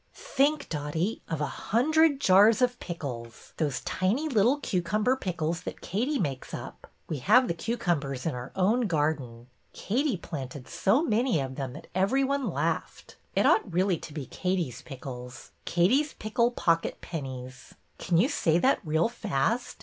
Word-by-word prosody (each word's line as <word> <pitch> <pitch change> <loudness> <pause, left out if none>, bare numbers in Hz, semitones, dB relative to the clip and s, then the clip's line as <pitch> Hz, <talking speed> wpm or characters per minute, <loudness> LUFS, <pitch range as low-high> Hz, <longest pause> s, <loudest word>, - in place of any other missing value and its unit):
Think, 285 +2 +1
Dotty, 160 +7 -2
of 160 -2 -2
a - - +2
hundred 295 - +2
jars 210 0 +6
of 245 0 +1
pickles, 125 -9 -7
those 145 -5 -1 0.2
little 240 +3 +3
tiny - - -17
cucumber 210 +7 +1
pickles 170 -7 -2
that - - -7
Katie 250 - -1
makes 140 - -3
up. - - -9 0.2
We 155 - -3
have 240 - +5
the - - 0
cucumbers 165 - -2
in 165 - 0
our 125 +1 -6
own 220 +6 +2
garden. 145 -8 -1 0.3
Katie 250 +1 0
planted 135 -5 -7
so 230 +11 +2
many 235 - +2
of 135 -1 -3
them 130 -2 -5
that 150 - -10
every 200 +10 +2
one 275 0 0
laughed. - - -3 0.2
It - - +3
ought 195 - +3
really 180 0 +1
to - - -9
be 145 -2 -5
Katie's 175 -9 -2
pickles, 125 -3 -9
Katie's 250 - +2
pickle 225 +2 +1
pocket 165 -8 0
pennies. 130 -4 -7 0.2
Can 170 - +1
you 215 - +5
say 170 - +2
that 260 +10 +3
real 160 +2 +2
fast? 225 - -1
180 Hz, 155 wpm, -28 LUFS, 145-240 Hz, 0.3 s, jars